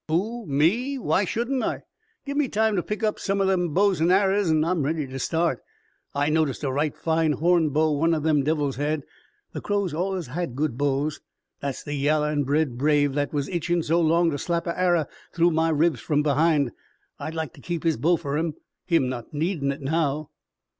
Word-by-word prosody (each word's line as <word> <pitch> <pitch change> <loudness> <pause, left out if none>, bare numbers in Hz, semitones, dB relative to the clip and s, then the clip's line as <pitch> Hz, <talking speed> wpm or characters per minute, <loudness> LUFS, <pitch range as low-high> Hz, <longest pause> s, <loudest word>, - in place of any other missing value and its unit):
"Who? 210 +8 -1
Me? 195 - +1
Why 205 -5 +1
shouldn't 240 +7 -1
I? - - -2 0.4
Give 280 0 -4
me 290 -2 +2
time 220 -1 +1
to 180 - +1
pick 210 +5 -5
up 215 -1 0
some 195 0 -1
o' 195 - +2
them 180 -3 +1
bows 195 0 +2
an' 165 - +3
arrers 195 0 +3
an' 155 -1 +3
I'm 170 -1 0
ready 150 +1 -1
to 135 0 -7
start. 165 +5 0 0.6
I 145 +1 +1
noticed 155 -3 0
a 135 - 0
right 145 +2 -1
fine 160 -1 +1
horn 170 0 +2
bow 155 +2 +2
one 165 +3 +2
o' - - -1
them 150 -1 +2
devils 145 -2 0
had 145 +1 -1 0.5
the - - -5
Crows 200 -5 -1
allus 185 +1 -2
had 145 0 -4
good 145 -3 -1
bows. 145 +2 -1 0.4
That's 140 -2 -4
the 145 - -5
yaller 150 +1 +1
an' 145 -2 0
red 140 -3 0
brave 145 -1 +3
that 145 0 -1
was 145 -2 -1
itchin' 175 -1 0
so 165 +3 +2
long 165 +1 +3
to 145 - -3
slap 170 +2 -1
a 170 - -1
arrer 175 -5 +2 0.3
through 170 0 +4
my 160 0 +2
ribs 155 -3 +2
from 150 +6 0
behind. 150 -2 +2 0.5
I'd 160 - -5
like 160 -5 -3
to - - -15
keep 170 0 -4
his 165 -2 +1
bow 170 +3 +3
fer 145 -1 -3
him, 160 -2 -2 0.3
him 165 -7 +3
not 125 +2 -6
needin' 155 -3 0
it 140 - -7
now." 150 0 -1
160 Hz, 210 wpm, -25 LUFS, 145-175 Hz, 0.6 s, through